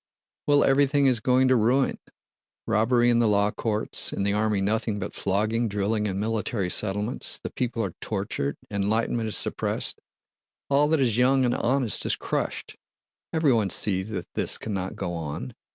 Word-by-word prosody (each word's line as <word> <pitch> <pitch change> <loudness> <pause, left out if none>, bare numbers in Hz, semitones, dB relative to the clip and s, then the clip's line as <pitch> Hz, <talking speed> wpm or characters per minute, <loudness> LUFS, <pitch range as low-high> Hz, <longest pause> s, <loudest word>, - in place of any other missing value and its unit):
"Well, 145 -1 +5
everything 140 +1 +3
is 130 -4 +3
going 130 +3 +3
to 130 - +5
ruin! 125 +4 +2 0.7
Robbery 120 +3 +3
in 120 - +3
the 115 - +3
law 100 0 +2
courts, 110 -1 -1
in - - -2
the 100 0 +1
army 105 -1 +1
nothing 105 +2 0
but - - -5
flogging, 110 +4 0
drilling, 105 +1 -1
and 95 -1 -3
Military 105 -3 -1
Settlements; 105 +4 -1
the - - -7
people 120 -3 -2
are 90 - -5
tortured, 95 -9 -3
enlightenment 110 +3 0
is 110 - -1
suppressed. - - -1 0.7
All 145 +2 +4
that 155 -1 +2
is 120 -3 +2
young 130 +1 +4
and 120 - +1
honest 125 -2 +1
is - - +1
crushed! - - -3 0.5
Everyone 130 -11 +2
sees 95 +1 +1
that 105 - -4
this - - -1
cannot 95 -3 -4
go 85 - -4
on. 80 -3 -5
110 Hz, 165 wpm, -25 LUFS, 100-125 Hz, 0.7 s, Well